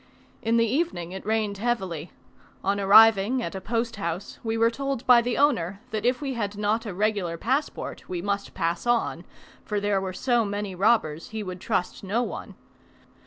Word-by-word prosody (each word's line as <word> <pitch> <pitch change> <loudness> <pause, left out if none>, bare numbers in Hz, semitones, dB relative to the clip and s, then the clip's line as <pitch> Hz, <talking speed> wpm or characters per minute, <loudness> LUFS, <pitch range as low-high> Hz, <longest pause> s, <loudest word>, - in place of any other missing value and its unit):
In 230 +1 +2
the 230 - +4
evening 230 - -1
it 190 0 -7
rained 215 -2 0
heavily: 190 -9 -2 0.5
on 200 +1 +1
arriving 220 +4 +6
at - - -4
a 190 - -5
posthouse 210 -5 -3
we 225 0 -1
were 230 +1 +4
told 275 0 -3
by 245 -2 +7
the 240 0 -2
owner, 200 - +2
that 215 +1 -1
if 250 +3 +1
we 275 -2 -2
had 205 -4 -3
not 215 +2 0
a 200 - -4
regular 200 -4 0
passport 265 - -2
we 180 - -3
must 200 +2 -3
pass 170 +6 -1
on, 240 -1 +1 0.4
for 210 -1 -2
there 200 -1 +1
were 190 -1 -3
so 240 +4 +1
many 205 -1 -3
robbers 180 -5 +1
he 220 -1 -4
would 185 -2 -7
trust 180 - -2
no 215 +5 0
one. - - -6
210 Hz, 180 wpm, -26 LUFS, 190-235 Hz, 0.5 s, by